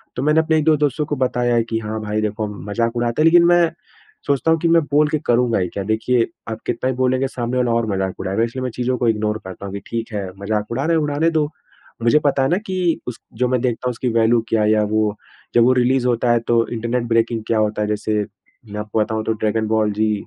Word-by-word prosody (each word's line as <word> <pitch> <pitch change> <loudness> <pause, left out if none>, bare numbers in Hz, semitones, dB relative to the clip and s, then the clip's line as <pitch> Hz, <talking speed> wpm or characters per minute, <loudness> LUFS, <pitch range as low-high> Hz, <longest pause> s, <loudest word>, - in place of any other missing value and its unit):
तो 130 - -2
मैंने 150 +2 +3
अपने 160 0 +1
1-2 155 0 +3
दोस्तों 150 0 0
को 150 - -2
बताया 125 -2 0
है 115 - +3
कि 115 0 -3
हाँ, 110 0 -4
भाई 105 0 -2
देखो 105 0 -2 0.2
मज़ाक 115 +2 0
उड़ाते 120 +4 0
हैं - - +4
लेकिन 170 +1 +6
मैं 175 -1 +4 0.6
सोचता 140 +3 +2
हूँ 165 - +3
कि 170 - +1
मैं 165 0 +5
बोल 150 +1 +4
के 155 - 0
करूँगा 120 -2 +2
ही 90 - 0
क्या? 100 - -4
देखिए 115 +3 +1 0.2
आप 110 - -5
कितना 120 +2 -1
भी 130 - -4
बोलेंगे 130 +1 +1
सामने 125 -1 -3
वाला 125 -2 +1
और 115 -1 +1
मज़ाक 95 -1 -2
उड़ाएगा 100 +4 -1
इसलिए 125 +3 -3
मैं 125 - -1
चीज़ों 125 +1 -1
को 120 - 0
इग्नोर 105 0 0
करता 95 +1 -8
हूँ, 100 - -6
कि 100 - -4
ठीक 115 -1 -4
है, 100 -2 -3
मज़ाक 105 +1 -2
उड़ा 130 +4 -1
रहे 165 0 +2
हैं, 155 - +1
उड़ाने 150 +3 +1
दो। 155 -2 +1 0.6
मुझे 120 +6 +4
पता 140 -1 +2
है 135 - +1
ना 180 - +2
कि 180 -3 0
उस 120 - -5
जो 125 +3 0
मैं 130 -1 +1
देखता 125 0 -1
हूँ - - +1
उसकी 125 +1 -2
वैल्यू 115 +1 +3
क्या 110 -1 +2
है 105 - +3
या 105 -1 +3
वो 110 -1 +1 0.4
जब 120 - +6
वो 130 +2 +5
रिलीज़ 125 0 +2
होता 120 0 +1
है 120 - +3
तो 115 -1 +2
इंटरनेट 120 +2 -1
ब्रेकिंग 115 -1 +1
क्या 115 -1 +1
होता 105 0 0
है 105 - 0
जैसे 105 0 -1 0.5
मैं 105 - -5
आपको 105 +1 -2
बताऊँ 110 0 -1
तो 110 - +1
ड्रैगन 110 0 -1
बॉल 110 -1 +1
जी 110 +1 +1
115 Hz, 260 wpm, -20 LUFS, 110-130 Hz, 0.6 s, लेकिन